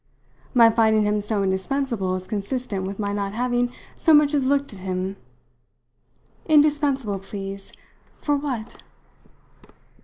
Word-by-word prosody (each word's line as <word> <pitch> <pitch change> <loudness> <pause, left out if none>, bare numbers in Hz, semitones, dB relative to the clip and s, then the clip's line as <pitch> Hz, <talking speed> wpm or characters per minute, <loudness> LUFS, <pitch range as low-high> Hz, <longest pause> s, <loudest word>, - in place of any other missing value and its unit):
My 230 -2 +7
finding 220 -1 +3
him 210 0 +1
so 210 -1 0
indispensable 195 +1 -1
is 185 0 -5
consistent 205 -1 -3
with 195 0 -5
my 205 -1 -2
not 200 -1 -2
having 245 +1 0 0.2
so 320 -2 +4
much 295 0 +4
as 275 -3 +2
looked 280 -2 +1
at 195 - -10
him. 185 +1 -3 1.3
Indispensable, 290 - +3
please, 195 0 -7 0.5
for 290 - +1
what?" 260 -6 -4
220 Hz, 125 wpm, -23 LUFS, 195-275 Hz, 1.3 s, My